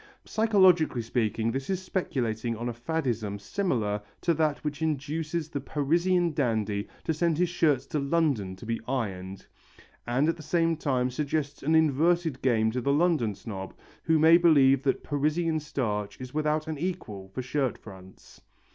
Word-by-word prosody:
Psychologically 185 - +3
speaking 115 -1 0
this 135 +2 -4
is 190 -2 0
speculating 120 - -2
on 120 +2 -4
a - - -4
faddism 120 -6 -2
similar 105 - -1 0.2
to 170 - +2
that 155 -2 +1
which 150 0 -4
induces 155 +1 -2
the 145 -3 -4
Parisian 170 +5 +1
dandy 110 -7 -1 0.2
to 160 - 0
send 165 0 +1
his 180 0 +2
shirts 150 -6 +1
to 150 - -2
London 140 - 0
to 95 - -12
be 115 0 -2
ironed, 95 -7 -4 0.6
and 130 +5 +2
at 165 - 0
the - - -9
same 165 +1 +1
time 130 -5 0
suggests 145 +1 -2
an 155 +3 +2
inverted 160 0 +2
game 110 -4 +2
to 125 +2 -2
the 140 - +1
London 145 - +2
snob 95 -3 -7 0.3
who 160 0 +2
may 160 +2 +7
believe 140 -6 +5
that 135 -1 0
Parisian 155 +3 0
starch 105 -9 -3
is 130 0 -8
without 155 +1 0
an 155 -2 -4
equal 110 - -5
for 125 +7 -5
shirt 130 0 -1
fronts. 95 -2 -14
140 Hz, 165 wpm, -27 LUFS, 115-160 Hz, 0.6 s, may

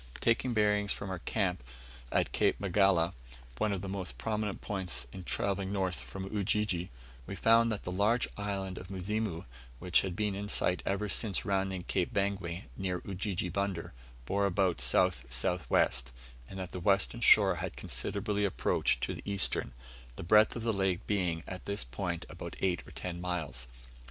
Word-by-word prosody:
Taking 120 +1 +2
bearings 105 -1 +2
from 100 - -3
our 90 - -3
camp - - -1 0.5
at - - +1
Cape - - +2
Magala, 95 -3 +3 0.5
one 105 - +2
of 95 -3 -2
the - - -4
most 95 -10 -4
prominent 105 - -2
points 95 -8 -2
in 95 - -7
travelling 100 +1 -1
north 95 -6 0
from 65 +10 -7
Ujiji, 100 -3 +1 0.4
we 100 - -5
found 115 +2 +5
that 105 - -3
the 90 - -4
large 105 +6 +2
island 100 -2 -3
of 90 - -10
Muzimu, 100 -1 -2 0.3
which 90 +5 +3
had 95 -2 -3
been 105 0 0
in 100 +1 -4
sight 90 -2 +2
ever 100 +2 0
since 105 +2 0
rounding 95 -2 0
Cape 90 +1 -1
Bangwe, 100 -4 -1
near 90 -2 -2
Ujiji 95 -2 -2
Bunder, 95 -2 -2 0.3
bore 100 +8 +1
about 90 -6 +1
south 90 +8 +3
south 90 -8 -1
west, 60 -1 +2 0.4
and 95 - -7
that 95 -2 -5
the 90 - -5
western 100 +5 +2
shore 100 -5 +7
had - - -4
considerably 105 -1 -1
approached 85 -9 +1
to - - 0
the - - -7
eastern; 100 -8 +1 0.4
the - - -6
breadth 105 +5 +5
of 115 - -4
the 115 -1 +1
lake 95 -1 0
being 90 -5 0
at 95 0 -7
this 100 -7 -1
point 85 +7 -4
about - - -8
eight 90 -2 +1
or - - -11
ten 85 -1 -5
miles. 75 -9 -3
95 Hz, 175 wpm, -32 LUFS, 90-100 Hz, 0.5 s, shore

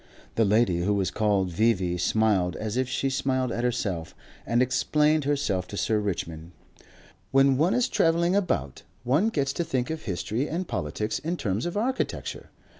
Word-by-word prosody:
The 115 - +2
lady 105 -4 +3
who 100 +4 +1
was 95 -3 0
called 100 -4 +1
V.V. 95 -2 +1
smiled 100 -2 +2
as 110 0 -4
if 130 0 0
she 135 - -1
smiled 130 -2 0
at 120 - -2
herself, 100 -9 -2 0.3
and 120 - +2
explained 150 +4 +2
herself 135 -11 0
to 100 - -7
Sir 110 +1 +1
Richmond. 85 -4 -4 0.8
"When 135 0 +4
one 170 - +2
is 250 -1 +2
travelling 170 +2 +2
about, 75 - -1 0.2
one 145 - +2
gets 140 -9 -1
to 170 - -1
think 130 -3 -2
of 160 -1 -4
history 110 - -2
and 175 +3 -3
politics 105 +9 -2
in 170 +4 -3
terms 105 - -1
of 175 - -4
architecture. 255 +5 -2
120 Hz, 170 wpm, -26 LUFS, 100-145 Hz, 0.8 s, When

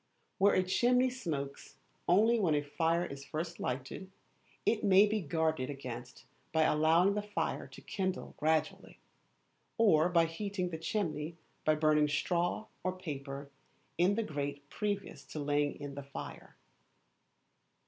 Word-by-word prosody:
Where 200 +1 +5
a 185 - +4
chimney 250 +7 +3
smokes 145 - -5 0.3
only 220 +6 +5
when 170 -7 +3
a 145 - +1
fire 165 +4 +1
is 140 0 -7
first 165 +4 -4
lighted, 130 +9 -4 0.6
it 220 - +2
may 195 0 +7
be 210 0 0
guarded 160 -4 0
against 125 -3 -7 0.3
by 160 0 +3
allowing 160 +5 +4
the 210 - -1
fire 205 0 -2
to - - -13
kindle 190 -2 -3
gradually, 155 +1 0 0.8
or 175 -8 +5
by 170 -2 +4
heating 180 +2 -3
the 160 - -4
chimney 160 -4 -2 0.3
by 155 - +4
burning 150 -1 +4
straw 175 +7 0 0.2
or 185 0 -1
paper 140 -4 -6 0.5
in 185 +3 +4
the 230 - 0
grate 145 -4 -4
previous 205 -2 -3
to 155 - -7
laying 145 0 0
in 145 -1 -6
the 140 - -6
fire. 140 0 -9
160 Hz, 140 wpm, -33 LUFS, 145-190 Hz, 0.8 s, may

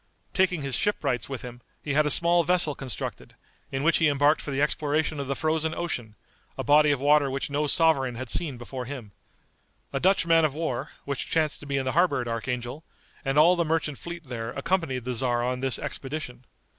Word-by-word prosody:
Taking 180 -5 +1
his 135 -2 -1
shipwrights 130 - -1
with 135 -1 -5
him, 120 0 -9 0.2
he 145 - -2
had 150 +1 +3
a - - +1
small 170 +3 +4
vessel 175 -3 +4
constructed, 130 -3 -7 0.4
in 135 +1 -2
which 165 +2 +4
he 160 -2 +3
embarked 145 +2 +3
for - - -7
the 135 -1 -2
exploration 150 +1 0
of 140 - -4
the 140 - -1
Frozen 160 +1 -1
Ocean, 120 -11 -4 0.4
a - - -3
body 150 +1 +5
of 145 -3 +1
water 145 0 +4
which 135 +1 -3
no 150 +1 0
sovereign 140 -5 +2
had 130 +2 -6
seen 145 -7 0
before 125 +1 -6
him. 125 -6 -8 0.8
A 135 - 0
Dutch 190 +2 +3
man 165 -1 +4
of 150 -3 +1
war, 150 -3 -3 0.2
which 140 -2 -4
chanced 155 -2 +1
to 145 - -11
be 140 -1 -1
in 135 - -1
the 130 - 0
harbor 170 -2 +2
at 120 - -3
Archangel, 120 +5 -4 0.4
and 135 0 -1
all 170 +4 +6
the 170 - +1
merchant 155 -3 -1
fleet 170 -3 -8
there 115 -2 -5
accompanied 140 -5 -1
the 125 - -2
tzar 120 0 +1
on 125 +1 -1
this 135 -3 +2
expedition. 130 -3 -6
145 Hz, 210 wpm, -26 LUFS, 130-160 Hz, 0.8 s, all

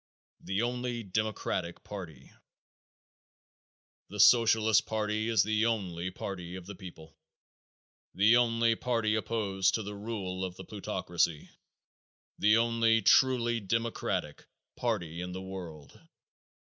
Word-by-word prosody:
The 95 +4 -2
Only 120 -1 -2
Democratic 100 -4 -3
Party. 80 -10 -9 1.8
The 105 - -8
Socialist 110 -1 +5
party 110 0 -1
is 110 -5 +4
the 110 +2 +1
only 95 -6 -2
party 90 -2 -6
of 95 -2 -8
the 100 - -8
people, 85 -5 -12 1.0
the 110 +5 +5
only 115 -1 +3
party 115 -2 0
opposed 105 -4 0
to 110 - -2
the 105 +1 -6
rule 100 -3 -4
of 90 -1 -4
the - - -9
plutocracy, 90 -6 -2 0.9
the 105 +2 +5
only 115 -1 +2
truly 120 +1 +4
democratic 115 +3 -2 0.3
party 90 -9 -2
in 90 0 -5
the 95 - -5
world. 85 -6 -9
105 Hz, 115 wpm, -30 LUFS, 95-115 Hz, 1.8 s, Socialist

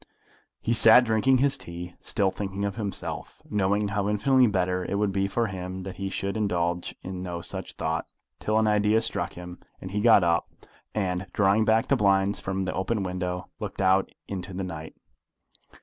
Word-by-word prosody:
He 115 - 0
sat 115 +2 +8
drinking 120 +3 +3
his 140 +2 +2
tea, 85 0 -7
still 95 -2 0
thinking 100 0 -3
of 100 -1 -3
himself, 105 -3 -5
knowing 100 0 +1
how 100 0 -1
infinitely 125 +5 +4
better 90 -2 0
it 100 - -3
would 100 0 +1
be 95 0 0
for 115 +4 0
him 95 -2 -5
that 95 0 -7
he 95 0 -3
should 100 +1 -3
indulge 90 -5 -1
in 90 -1 -5
no 90 -2 -4
such 85 - -6
thought, - - -2 0.3
till 110 0 0
an 110 - +3
idea 105 +1 +3
struck - - -1
him, 90 0 -9 0.2
and 95 - -8
he 105 +1 -1
got 110 -4 +6
up, 85 -1 +1 0.5
and, 95 -2 -1
drawing 105 +2 +3
back 110 +2 +3
the 140 - +3
blinds 100 -3 +2
from 95 0 -2
the 90 - -2
open 100 +2 -1
window, 90 -1 -3
looked - - -6
out 95 0 +3 0.2
into 95 -1 -5
the 95 - -3
night. 80 -3 -7
95 Hz, 185 wpm, -26 LUFS, 90-105 Hz, 0.5 s, sat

